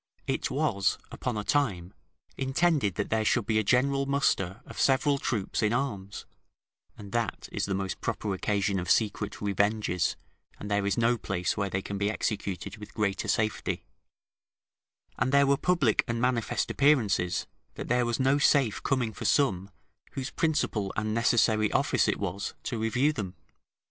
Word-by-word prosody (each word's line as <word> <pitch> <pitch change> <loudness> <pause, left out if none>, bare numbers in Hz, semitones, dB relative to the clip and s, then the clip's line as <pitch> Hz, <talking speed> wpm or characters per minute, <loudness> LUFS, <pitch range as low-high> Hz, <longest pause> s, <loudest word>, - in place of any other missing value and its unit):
It - - -1
was 100 -1 +1
upon 125 -4 -3
a 105 - -2
time 100 -11 0 0.4
intended 135 - +1
that 100 - -3
there 110 0 +2
should 110 +1 +2
be 110 -1 +2
a - - +1
general 135 +5 +2
muster 120 -7 0
of - - -10
several 140 +1 +3
troops 110 -7 -2
in 110 0 +2
arms 105 -7 -3 0.7
(and 100 -1 -10
that 115 -3 -2
is - - -1
the 95 - -1
most 95 -1 -3
proper 105 -2 -2
occasion 100 0 0
of 90 - -4
secret 105 -2 +1
revenges, 100 -2 0 0.4
and 105 - -6
there 100 -1 +1
is 100 - 0
no 120 0 +2
place 90 -3 -1
where 100 -2 -1
they 95 +1 -2
can 100 -1 -5
be 100 +1 +1
executed 100 -3 -3
with 105 -1 -11
greater 105 -3 -1
safety), 110 -1 -1 1.4
and 125 +3 +1
there 140 0 +5
were 140 0 +4
public 145 -6 +2
and 115 0 -1
manifest 125 -2 0
appearances, 110 -11 +2 0.3
that - - -6
there 125 0 +2
was 120 +1 -1
no 135 +2 +3
safe 135 -6 +3
coming 125 -5 0
for - - -7
some, 100 -10 +2 0.4
whose 135 -2 -4
principal 115 -11 0
and 110 0 -1
necessary 110 -2 +3
office - - +2
it - - +1
was 100 0 -4
to 120 - -3
review 125 +7 +2
them. 95 -7 -5
110 Hz, 165 wpm, -28 LUFS, 100-130 Hz, 1.4 s, there